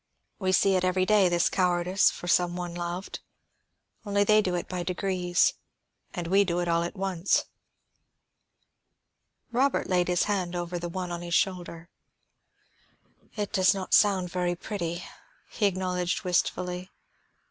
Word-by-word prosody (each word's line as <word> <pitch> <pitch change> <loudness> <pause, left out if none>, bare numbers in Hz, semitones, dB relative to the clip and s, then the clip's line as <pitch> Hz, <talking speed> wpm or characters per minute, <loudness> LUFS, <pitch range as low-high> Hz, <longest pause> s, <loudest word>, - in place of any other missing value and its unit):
We 190 -2 0
see 195 +1 +3
it 185 - +1
every 185 0 +1
day, 205 -2 +4
this 175 -1 +2
cowardice 180 0 +2
for 175 - -8
some 175 0 +2
one 175 -1 -5
loved. 175 +2 -5 0.8
Only 205 -1 +1
they 215 +1 +5
do 185 -3 -1
it 175 - -3
by 180 -1 -4
degrees, 180 0 +1 0.6
and 175 -2 -3
we 195 +4 +4
do 175 -2 -1
it 175 - -1
all 170 0 +2
at 170 +4 -4
once." 190 -2 0 2.1
Robert 260 +3 +1
laid 180 -1 +1
his 180 0 +2
hand 185 -4 -2
over 175 0 -3
the 175 0 -5
one 180 0 -4
on 170 0 -4
his 170 -1 -2
shoulder. 175 -3 -1 1.5
"It 210 -1 -3
does 190 -2 +4
not 190 -1 -5
sound 190 -4 +4
very 180 -1 -1
pretty," 175 -2 -4 0.5
he 210 - +1
acknowledged 180 -2 -2
wistfully. 180 0 -1
180 Hz, 145 wpm, -27 LUFS, 175-190 Hz, 2.1 s, they